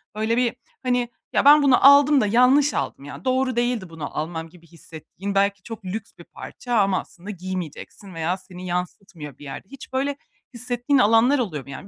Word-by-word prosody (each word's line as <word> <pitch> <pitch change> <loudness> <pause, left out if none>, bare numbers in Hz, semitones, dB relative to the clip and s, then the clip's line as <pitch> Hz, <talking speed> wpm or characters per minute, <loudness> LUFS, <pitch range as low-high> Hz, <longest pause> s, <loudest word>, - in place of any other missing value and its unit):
böyle 220 +2 0
bir, 245 -2 +1 0.3
hani, 245 -1 0 0.2
"Ya, - - +2
ben 295 +1 +8
bunu 270 -2 +4
aldım 285 0 +6
da 210 - +1
yanlış 255 +6 +4
aldım. 140 - -4
Ya, 145 +2 -10
doğru 255 -1 +1
değildi 240 -6 -1
bunu 160 -3 -7
almam." 160 +1 -4
gibi 170 0 -19
hissettiğin 170 +4 -8
belki 200 -1 +1
çok 225 -2 -9
lüks 205 +4 -5
bir - - -12
parça 245 -2 -8
ama 195 -2 +2
aslında 185 +4 -12
giymeyeceksin 185 0 -7
veya 165 +3 -2
seni 185 -1 -11
yansıtmıyor 175 - -5
bir - - -14
yerde. 140 +6 -8
Hiç 275 -1 -12
böyle 275 +2 -1 0.4
hissettiğin 245 +3 0
alanlar 235 +5 +4
oluyor 165 - -3
mu? - - -16
Yani 140 - -9
205 Hz, 185 wpm, -23 LUFS, 175-250 Hz, 0.4 s, ben